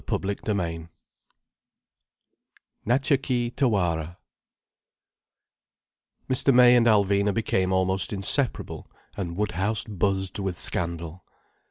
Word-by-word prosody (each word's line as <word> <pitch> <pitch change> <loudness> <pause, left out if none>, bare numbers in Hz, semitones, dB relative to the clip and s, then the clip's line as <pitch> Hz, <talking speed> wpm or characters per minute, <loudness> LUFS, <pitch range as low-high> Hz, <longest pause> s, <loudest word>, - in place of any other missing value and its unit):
CHAPTER 100 +2 -2
VII 85 -3 -4 2.0
NATCHA 135 +3 +2
KEE 120 -3 -2
TAWARA 90 - -1 2.1
Mr. 130 +1 +3
May 125 -1 +6
and 120 -1 +3
Alvina 100 -1 +2
became 95 -3 -1
almost 95 0 0
inseparable, 110 +6 0 0.3
and 85 -3 -5
Woodhouse 105 +1 -1
buzzed 95 -1 -2
with 95 -3 -3
scandal. 85 0 -2
100 Hz, 85 wpm, -25 LUFS, 90-115 Hz, 2.1 s, May